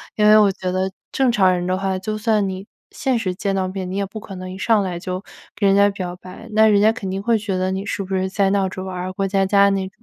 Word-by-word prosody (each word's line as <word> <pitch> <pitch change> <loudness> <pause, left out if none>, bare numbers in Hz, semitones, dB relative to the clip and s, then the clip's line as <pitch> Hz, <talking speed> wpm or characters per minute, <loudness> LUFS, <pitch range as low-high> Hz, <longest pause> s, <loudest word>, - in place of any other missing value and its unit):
因 210 -1 +3
为 215 0 +8
我 210 -2 +5
觉 185 -1 -4
得 190 +1 -1 0.2
正 265 -2 +2
常 190 -5 +4
人 180 -1 -1
的 185 +1 0
话， 190 -1 -1
就 215 +3 -4
算 215 -2 +1
你 190 +1 -6 0.2
现 260 -2 -1
实 185 -4 -2
见 195 +1 -2
到 190 -1 0
面， 185 -1 -5
你 190 - -3
也 200 - 0
不 210 +3 -8
可 195 -2 -9
能 185 0 -7
一 185 - -8
上 215 +2 +2
来 180 -2 -3
就 185 +1 -4 0.3
给 200 - +1
人 195 - +4
家 200 0 +5
表 185 -3 -5
白， 185 0 -12
那 220 +1 +5
人 205 -2 +4
家 215 +1 +5
肯 210 -6 -6
定 195 +1 -3
会 230 +2 +2
觉 200 -3 -3
得， 185 0 0
你 190 +1 -3
是 205 - -3
不 190 0 -3
是 190 0 0
在 195 0 +1
闹 195 -1 +1
着 185 0 -7
玩 190 -1 -6
儿、 180 +1 -4
过 195 +1 -1
家 195 0 +1
家 200 +1 +4
那 195 -1 -1
195 Hz, 315 characters per minute, -21 LUFS, 185-205 Hz, 0.3 s, 为